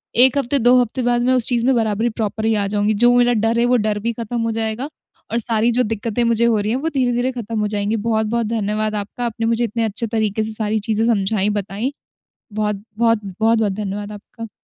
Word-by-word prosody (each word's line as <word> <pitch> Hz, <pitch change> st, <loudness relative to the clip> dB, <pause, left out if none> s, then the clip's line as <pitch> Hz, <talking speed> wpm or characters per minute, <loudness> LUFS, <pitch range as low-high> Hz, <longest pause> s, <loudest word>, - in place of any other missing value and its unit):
1 260 Hz, +3 st, +6 dB
हफ़्ते 275 Hz, +1 st, +1 dB
2 245 Hz, +2 st, +5 dB
हफ़्ते 245 Hz, +2 st, -2 dB
बाद 240 Hz, 0 st, +1 dB
मैं 255 Hz, +1 st, +2 dB
उस 250 Hz, -1 st, +2 dB
चीज़ 240 Hz, -1 st, +1 dB
में 265 Hz, -, +4 dB
बराबरी 225 Hz, 0 st, 0 dB
प्रॉपर 220 Hz, -1 st, -3 dB
ही 225 Hz, -, +2 dB
आ 205 Hz, -1 st, +1 dB
जाऊँगी। 205 Hz, +1 st, +1 dB
जो 240 Hz, 0 st, +6 dB
मेरा 245 Hz, 0 st, +4 dB
डर 230 Hz, +1 st, +1 dB
है 235 Hz, -, +3 dB
वो 250 Hz, +1 st, +3 dB
डर 210 Hz, -1 st, -1 dB
भी 235 Hz, +3 st, -2 dB
ख़त्म 235 Hz, +1 st, -4 dB
हो 230 Hz, 0 st, -1 dB
जाएगा 225 Hz, +4 st, -3 dB, 0.4 s
और 230 Hz, -, 0 dB
सारी 230 Hz, +1 st, +2 dB
जो 250 Hz, +2 st, +2 dB
दिक्क़तें 225 Hz, +1 st, -2 dB
मुझे 235 Hz, 0 st, +2 dB
हो 225 Hz, -3 st, +2 dB
रही 210 Hz, +2 st, -1 dB
हैं 250 Hz, -, +1 dB
वो 310 Hz, +5 st, -2 dB
धीरे-धीरे 250 Hz, -1 st, +1 dB
खत्म 230 Hz, -3 st, -4 dB
हो 210 Hz, -, 0 dB
जाएँगी, 205 Hz, +1 st, -1 dB
बहुत-बहुत 225 Hz, +1 st, 0 dB
धन्यवाद 215 Hz, -1 st, -1 dB
आपका। 210 Hz, +4 st, -4 dB
आपने 230 Hz, -1 st, -3 dB
मुझे 230 Hz, +1 st, +1 dB
इतने 230 Hz, 0 st, -1 dB
अच्छे 220 Hz, +2 st, -1 dB
तरीके 220 Hz, -1 st, -1 dB
से 220 Hz, -, -3 dB
सारी 215 Hz, 0 st, 0 dB
चीज़ें 220 Hz, +1 st, 0 dB
समझाईं 210 Hz, -2 st, +1 dB
बताईं। 205 Hz, +5 st, -3 dB, 0.6 s
बहुत-बहुत 215 Hz, +2 st, 0 dB, 0.2 s
बहुत-बहुत 220 Hz, -2 st, +2 dB
धन्यवाद 205 Hz, 0 st, -5 dB
आपका। 215 Hz, +2 st, -10 dB
225 Hz, 220 wpm, -19 LUFS, 210-235 Hz, 0.6 s, 1